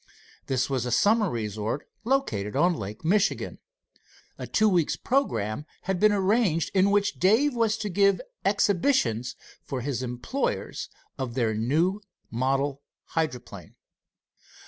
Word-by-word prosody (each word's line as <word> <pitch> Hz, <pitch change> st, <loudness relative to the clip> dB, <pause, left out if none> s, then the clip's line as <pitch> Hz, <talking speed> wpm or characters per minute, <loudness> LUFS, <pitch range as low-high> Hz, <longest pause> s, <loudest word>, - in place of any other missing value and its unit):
This 130 Hz, -1 st, +1 dB
was 130 Hz, -3 st, -1 dB
a -, -, -2 dB
summer 210 Hz, -, +3 dB
resort 110 Hz, +2 st, -3 dB, 0.2 s
located 115 Hz, -, 0 dB
on 175 Hz, +6 st, +4 dB
Lake 105 Hz, 0 st, -7 dB
Michigan. 200 Hz, +4 st, +1 dB, 0.8 s
A -, -, -5 dB
two 215 Hz, -, +3 dB
weeks' 175 Hz, -6 st, +2 dB
programme 145 Hz, -, -1 dB, 0.2 s
had 190 Hz, -1 st, -1 dB
been 215 Hz, +2 st, +5 dB
arranged, 195 Hz, -4 st, +2 dB
in 195 Hz, 0 st, +4 dB
which 205 Hz, 0 st, +1 dB
Dave 225 Hz, +10 st, +4 dB
was 225 Hz, -2 st, +1 dB
to 215 Hz, -, -3 dB
give 200 Hz, -1 st, +3 dB, 0.2 s
exhibitions 190 Hz, -, +1 dB, 0.3 s
for 130 Hz, -2 st, -5 dB
his 130 Hz, -1 st, -2 dB
employers 125 Hz, -, -3 dB, 0.3 s
of 125 Hz, -3 st, -3 dB
their 115 Hz, -4 st, +1 dB
new 160 Hz, -, +1 dB, 0.3 s
model 135 Hz, +3 st, 0 dB, 0.3 s
hydroplane. 155 Hz, -6 st, -4 dB
165 Hz, 125 wpm, -26 LUFS, 125-205 Hz, 0.8 s, been